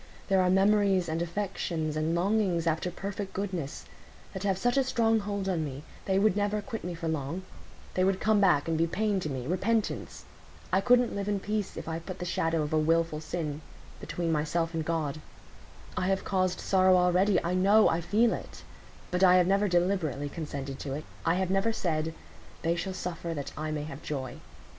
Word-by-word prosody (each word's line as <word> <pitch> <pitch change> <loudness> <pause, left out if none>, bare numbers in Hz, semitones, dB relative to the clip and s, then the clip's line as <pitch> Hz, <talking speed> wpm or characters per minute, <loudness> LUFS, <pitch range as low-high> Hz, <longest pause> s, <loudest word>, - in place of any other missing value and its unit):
There 190 -1 +4
are 180 - +3
memories, 195 -1 +3
and 160 +1 -2
affections, 170 -4 -2
and 155 +2 0
longings 185 -2 +1
after 165 +2 0
perfect 195 +2 -5
goodness, 185 -8 -4 0.5
that 190 - -5
have 195 -2 +1
such 245 +5 +1
a 275 - +4
strong 225 -3 +2
hold 200 -1 -3
on 175 -4 0
me; 140 -1 -6 0.2
they 190 -1 +1
would 205 0 +3
never 205 +1 0
quit 220 +2 -6
me 180 -1 -4
for 165 0 -4
long; 160 +3 -2 0.5
they 185 - +1
would 190 0 +2
come 215 -1 +3
back 175 -7 +4
and 165 - +1
be 165 - +3
pain 205 +2 0
to 155 - -3
me—repentance. 185 - -1 0.5
I 190 - +4
couldn't 245 +1 +4
live 200 0 -2
in 205 -1 0
peace 210 0 -3
if - - -6
I 165 0 -2
put 185 +2 -7
the 180 - -5
shadow 165 -2 0
of 150 - -4
a 155 - +4
wilful 165 0 +1
sin 155 -2 -4 0.4
between 170 -1 -2
myself 165 +2 0
and 160 -1 -1
God. 155 -2 -2 0.7
I 185 - 0
have 195 0 0
caused 185 -2 0
sorrow 185 -1 +4
already—I 180 0 +3
know—I 190 -2 +4
feel 220 +7 +3
it; - - -8 0.5
but 180 +1 +1
I 180 -1 +7
have 180 -1 +5
never 200 +3 +2
deliberately 175 -6 0
consented 140 -4 -5
to 135 - -4
it; 150 +2 -4 0.2
I 165 - +4
have 185 0 0
never 195 +4 +2
said, 160 -6 -1 0.5
'They 165 +1 +2
shall 190 +2 -3
suffer, 170 -2 -4
that 140 -2 -5
I 155 +1 -3
may 150 -1 -2
have 150 -1 -8
joy. 130 -4 -4
180 Hz, 195 wpm, -29 LUFS, 160-195 Hz, 0.7 s, I